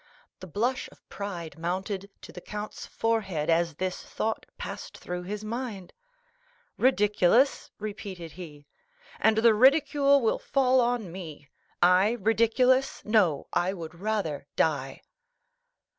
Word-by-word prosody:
The 185 - -9
blush 235 - -1
of - - -22
pride 175 -6 -6
mounted 190 +3 -3
to - - -10
the 180 - -10
count's 210 +2 -7
forehead 195 -9 -1
as 165 -1 +1
this 185 +3 -3
thought 220 0 -3
passed - - -7
through 180 0 -5
his 205 +4 -5
mind. 215 -4 -5 0.8
"Ridiculous?" 225 +1 +3
repeated 200 -5 -7
he; 150 -5 -11 0.5
"and 220 0 +3
the 225 0 +6
ridicule 280 +3 +5
will 225 - +1
fall 260 -1 +2
on 235 -6 -1
me. 155 -6 -9 0.3
I 185 +5 +5
ridiculous? 230 +5 +2
No, 200 -10 +2
I 180 +2 +1
would 165 -4 -7
rather 175 -7 -3
die." 140 -4 0
200 Hz, 125 wpm, -27 LUFS, 175-230 Hz, 0.8 s, the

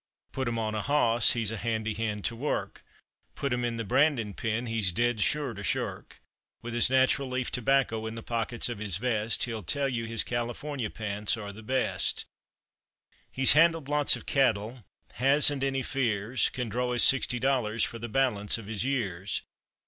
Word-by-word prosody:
Put 130 -2 -3
him 115 0 -2
on 110 -1 -2
a 105 - -2
hoss, 120 -5 +3
he's 115 -3 +1
a 115 - -4
handy 110 -1 -2
hand 105 -1 -4
to 120 - -2
work; 140 +6 -4 0.5
Put 140 -3 -2
him 125 0 -2
in 120 -1 -2
the 115 - -3
brandin' 125 -3 +1
pen, 115 +3 -3
he's 110 -5 +1
dead 120 +3 0
sure 145 +1 +1
to 100 - -9
shirk. - - -3 0.4
With 120 0 -6
his 120 +1 +4
natural 130 +1 +2
leaf 130 -1 -3
tobacco 125 -3 0
in 110 - -6
the 115 - -8
pockets 115 0 -1
of 120 -4 -5
his 100 -5 0
vest 115 -1 +1
He'll 115 -3 -3
tell 140 - -1
you 120 -3 -3
his 115 0 +1
California 120 +1 -4
pants 105 +1 -2
are 100 -2 -7
the 110 - -11
best. 130 +4 -1 1.1
He's 130 0 +6
handled 165 -1 +3
lots 145 -1 +3
of - - -10
cattle, 115 -3 0 0.3
hasn't 140 - +3
any 135 -1 -1
fears, 120 -2 0
Can 125 -2 -4
draw 125 +3 -2
his 120 - +4
sixty 130 -1 +4
dollars 120 -4 0
for 115 - -3
the 115 +1 -6
balance 110 -5 +1
of 115 - -10
his 105 0 -2
years. 105 -8 -2
120 Hz, 185 wpm, -28 LUFS, 110-130 Hz, 1.1 s, He's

